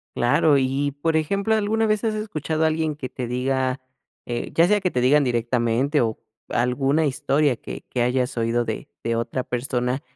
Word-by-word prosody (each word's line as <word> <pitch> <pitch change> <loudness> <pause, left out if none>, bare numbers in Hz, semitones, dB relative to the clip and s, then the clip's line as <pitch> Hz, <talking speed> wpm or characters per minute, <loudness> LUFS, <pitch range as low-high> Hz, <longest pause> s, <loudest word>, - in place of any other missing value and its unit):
Claro. 145 +4 +3
Y 135 +2 0
y - - -1
por 160 +3 0
ejemplo, 200 +7 +1
¿alguna 220 +1 +1
vez 215 +1 +1
has 220 - +1
escuchado 160 -7 -2
a - - +5
alguien 155 -1 -1
que 130 -4 -6
te 125 -2 -5
diga 130 +1 -1 0.4
eh, 120 -1 -3
ya 165 - +5
sea 210 +2 +3
que 185 -2 0
te 125 - -1
digan 140 +3 +4
directamente, 120 +4 +1
o, 110 -2 0 0.3
alguna 135 +5 +1
historia 140 -1 +1
que - - -8
que 125 - -1
hayas 125 0 0
oído 115 +1 +1
de 110 -1 -5 0.2
de 115 0 0
otra 125 +2 -2
persona 125 +1 -2
135 Hz, 190 wpm, -23 LUFS, 125-160 Hz, 0.4 s, a